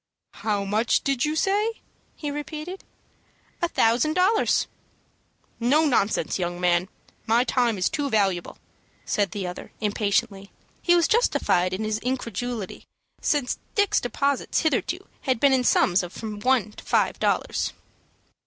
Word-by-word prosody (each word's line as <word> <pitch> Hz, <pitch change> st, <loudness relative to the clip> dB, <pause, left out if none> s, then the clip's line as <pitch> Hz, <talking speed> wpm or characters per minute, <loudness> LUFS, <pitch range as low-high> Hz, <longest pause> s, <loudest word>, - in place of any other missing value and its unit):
"How 205 Hz, -2 st, 0 dB
much 215 Hz, +4 st, +1 dB
did 275 Hz, -2 st, +1 dB
you 305 Hz, +1 st, -1 dB
say?" 410 Hz, +6 st, +1 dB, 0.4 s
he 295 Hz, -2 st, -4 dB
repeated. 305 Hz, +5 st, -6 dB, 0.8 s
"A 345 Hz, -, +2 dB
thousand 240 Hz, +7 st, +2 dB
dollars." 385 Hz, +5 st, +3 dB, 0.9 s
"No 280 Hz, +7 st, +3 dB
nonsense, 220 Hz, -8 st, +1 dB
young 175 Hz, 0 st, -2 dB
man! 180 Hz, +1 st, +2 dB, 0.4 s
My 230 Hz, +2 st, +4 dB
time 245 Hz, -4 st, +1 dB
is 180 Hz, -, +1 dB
too 290 Hz, -3 st, -2 dB
valuable," 195 Hz, -6 st, 0 dB, 0.5 s
said 205 Hz, -2 st, +1 dB
the 195 Hz, +1 st, -4 dB
other, 180 Hz, 0 st, -7 dB
impatiently. 205 Hz, -1 st, -1 dB, 0.3 s
He 350 Hz, -, +4 dB
was 340 Hz, -1 st, +4 dB
justified 185 Hz, -, +2 dB
in 190 Hz, +4 st, -3 dB
his 215 Hz, 0 st, -1 dB
incredulity, 245 Hz, -4 st, -4 dB, 0.3 s
since 285 Hz, -5 st, 0 dB, 0.2 s
Dick's 410 Hz, -1 st, +3 dB
deposits 275 Hz, +2 st, 0 dB
hitherto 335 Hz, +5 st, -1 dB
had 260 Hz, -4 st, 0 dB
been 280 Hz, +1 st, +4 dB
in 255 Hz, -1 st, +3 dB
sums 185 Hz, -5 st, +3 dB
of 180 Hz, -1 st, -7 dB
from 215 Hz, -1 st, -6 dB
one 240 Hz, -2 st, +2 dB
to -, -, -13 dB
five -, -, +1 dB
dollars. -, -, 0 dB
240 Hz, 140 wpm, -25 LUFS, 200-300 Hz, 0.9 s, My